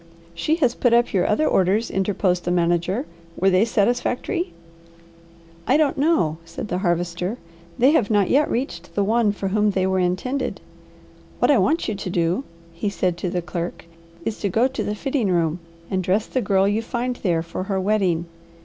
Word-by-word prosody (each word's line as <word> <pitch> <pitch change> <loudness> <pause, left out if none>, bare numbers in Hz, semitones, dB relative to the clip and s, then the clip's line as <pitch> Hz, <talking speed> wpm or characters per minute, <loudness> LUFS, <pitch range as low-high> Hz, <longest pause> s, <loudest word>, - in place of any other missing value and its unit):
"She 235 - 0
has 260 -8 +2
put 245 -2 +3
up 240 0 +2
your 185 -3 +2
other 260 +9 +2
orders," 195 +5 +2
interposed 190 -2 0
the - - -2
manager; 175 - +1 0.3
"were 195 +1 +3
they 185 +4 +4
satisfactory?" 245 - 0 1.2
"I - - +4
don't 305 -3 +2
know," 275 - +2
said 165 +5 -7
the 180 - -1
Harvester. 175 +3 -1 0.4
"They 260 +4 +5
have 250 -10 +2
not 205 -3 +3
yet 290 +7 +3
reached 180 -9 -4
the 205 - +2
one 220 +1 +2
for 200 -1 -3
whom 210 +1 +2
they 190 -2 0
were 190 0 +1
intended. 185 +10 -1 0.8
What - - +3
I - - +5
want 325 +2 +1
you 215 - -1
to 195 -2 -5
do," 175 +6 0 0.3
he 170 +5 -2
said 185 -3 -1
to 180 - -2
the 175 -1 -2
clerk, 170 -1 -5 0.4
"is 225 - -3
to 200 - -1
go 225 +7 +3
to 265 - -4
the 210 - -2
fitting 260 -3 -1
room 170 -1 +1 0.3
and 190 -1 0
dress 195 +4 +1
the 255 - -1
girl 195 -2 +2
you 210 +2 +1
find 245 +1 -3
there 170 -4 0
for 170 +2 -5
her 195 -1 -1
wedding. 190 -4 +1
195 Hz, 190 wpm, -22 LUFS, 180-235 Hz, 1.2 s, They